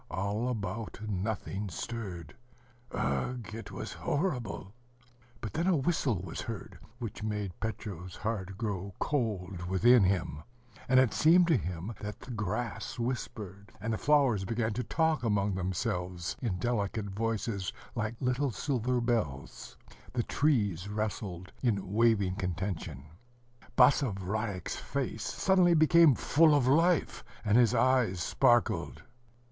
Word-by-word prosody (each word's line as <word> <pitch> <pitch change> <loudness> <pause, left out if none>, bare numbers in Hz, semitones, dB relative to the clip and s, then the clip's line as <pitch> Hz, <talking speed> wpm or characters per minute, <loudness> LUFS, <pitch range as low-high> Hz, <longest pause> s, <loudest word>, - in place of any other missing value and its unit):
All 105 +6 -1
about, 110 -2 -4
nothing 100 0 -3
stirred. 90 -2 -6 0.6
Ugh! 70 - -1
it 115 -1 -7
was - - -6
horrible! 125 - -2 0.7
But 105 -4 -5
then 170 - 0
a 185 -4 +4
whistle 130 - 0
was 85 - -5
heard, - - -7 0.2
which 115 -4 -6
made 105 -3 -3
Petro's 95 -5 -5
heart 100 -4 -3
grow 100 -3 -3
cold 100 - -2
within 110 +5 +5
him; 90 -6 0 0.5
and 130 0 +6
it 130 -3 +3
seemed 175 +3 +6
to 165 - +5
him 90 0 -3
that 105 0 -6
the 130 - -10
grass 105 0 -3
whispered, 115 -5 -4
and 110 +3 -2
the - - -1
flowers 140 -9 +3
began 110 +2 -1
to 125 +4 -2
talk 160 +5 +1
among 105 -4 +1
themselves 90 -1 -2
in 110 -8 -1
delicate 110 0 -1
voices, 110 -2 -2 0.2
like 110 +1 -2
little 130 +2 +1
silver 125 0 -1
bells; 110 - -2 0.4
the 120 -1 0
trees 105 - +1
rustled 105 -4 -4
in 100 -6 0
waving 105 -4 +3
contention; 90 - -3 0.7
Basavriuk's 105 - +2
face 130 -5 -3
suddenly 185 -3 +3
became 160 -2 +6
full 155 +4 +4
of 140 -4 +3
life, 165 +5 +3 0.2
and 105 0 +3
his 120 -3 +5
eyes 125 -8 +3
sparkled. 120 +6 +2
110 Hz, 130 wpm, -31 LUFS, 95-125 Hz, 0.7 s, and